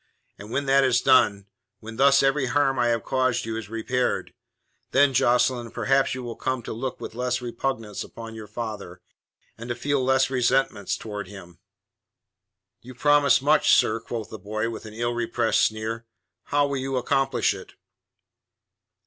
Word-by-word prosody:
And 105 - -10
when 140 +4 -2
that 135 0 +4
is 125 -2 +3
done, 105 -7 +3 0.3
when 110 0 -10
thus 140 +1 +5
every 135 -1 +2
harm 135 -1 +1
I 120 - +3
have 115 -3 0
caused 130 -1 0
you 115 -1 -4
is 110 -3 -6
repaired, 125 +3 -2 0.6
then, 140 0 +4
Jocelyn, 125 -1 +2
perhaps 135 +3 +1
you 130 - -6
will 120 -1 -6
come 130 -2 -3
to - - -5
look 125 +3 -5
with - - -7
less 125 +1 -1
repugnance 120 -3 -4
upon 115 -1 -10
your 110 -1 -9
father, 105 -5 -6 0.6
and 115 +1 -8
to 120 - -1
feel 140 +2 -1
less 130 0 +2
resentment 125 -5 +1
towards 105 -3 -7
him." 90 -4 -12 1.2
"You 130 +1 -12
promise 145 -1 +4
much, 150 +1 +5
sir," 110 +1 +2
quoth 115 -1 -6
the 110 - -8
boy, 110 +4 -3
with 110 -1 -8
an 110 - -11
illrepressed 120 -1 0
sneer. 110 +1 -2 0.4
"How 145 0 +2
will 140 -1 -2
you 135 0 -2
accomplish 135 -2 +1
it?" - - -11
120 Hz, 165 wpm, -25 LUFS, 110-135 Hz, 1.2 s, thus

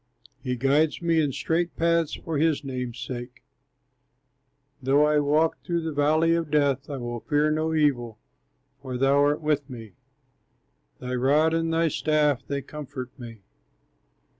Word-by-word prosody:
He 125 0 -2
guides 140 +5 +2
me 165 -1 +3
in 145 -2 0
straight 165 +5 -1
paths 170 -1 +1
for 160 -3 -4
his 155 -2 +1
name's 125 -3 -5
sake; 125 0 -7 1.4
Though 140 +3 +3
I 150 0 +3
walk 150 +3 +1
through 170 -1 -1
the 160 -1 -3
valley 155 +3 +3
of 165 -2 -1
death, 140 -2 +1
I 140 - -4
will 120 -1 -5
fear 150 +4 +1
no 160 +1 0
evil, 120 -7 +1 0.6
for 130 -2 -5
thou 135 +2 +3
art 145 +2 +2
with 150 -2 -1
me, 115 -4 -9 1.1
Thy 125 0 -5
rod 145 +6 +3
and 165 0 0
thy 165 0 +2
staff 150 -3 +1
they 140 -1 -3
comfort 130 -3 -8
me. 115 -4 -10
145 Hz, 150 wpm, -25 LUFS, 130-155 Hz, 1.4 s, me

